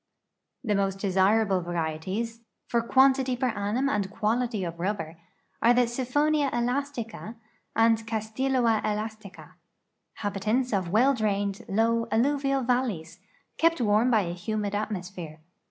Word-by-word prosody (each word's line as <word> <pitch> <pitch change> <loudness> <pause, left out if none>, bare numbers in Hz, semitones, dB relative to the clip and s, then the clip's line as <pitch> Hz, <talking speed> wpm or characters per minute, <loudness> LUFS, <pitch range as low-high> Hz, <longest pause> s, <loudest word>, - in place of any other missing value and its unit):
The 215 -4 0
most 195 -1 0
desirable 195 0 +2
varieties 175 +7 -3 0.2
for 235 - +1
quantity 265 +1 +3
per 255 0 0
annum 215 +5 -1
and 205 -7 0
quality 220 +1 -1
of 170 -1 -5
rubber 170 -4 -3 0.4
are 230 - +4
ihe 245 - +6
SV;)/j(m/ae/a«^"ca 255 -2 -1 0.4
and 225 0 +3
Caddloa 225 +1 0
el/isUca, 210 -6 -5 0.7
hahitanii^ 215 +4 0
of 185 -3 -1
well 245 +9 +4
drained, 205 -4 -1
low, 230 +3 +1
alluvial 275 +3 +1
val 250 +1 +2
leys, 165 -7 -7 0.4
kept 330 -1 +3
warm 220 +1 +3
by 225 -4 +4
a 170 -3 -3
humid 205 +3 -3
atmosphere. 185 -6 -4
220 Hz, 120 wpm, -27 LUFS, 195-245 Hz, 0.7 s, ihe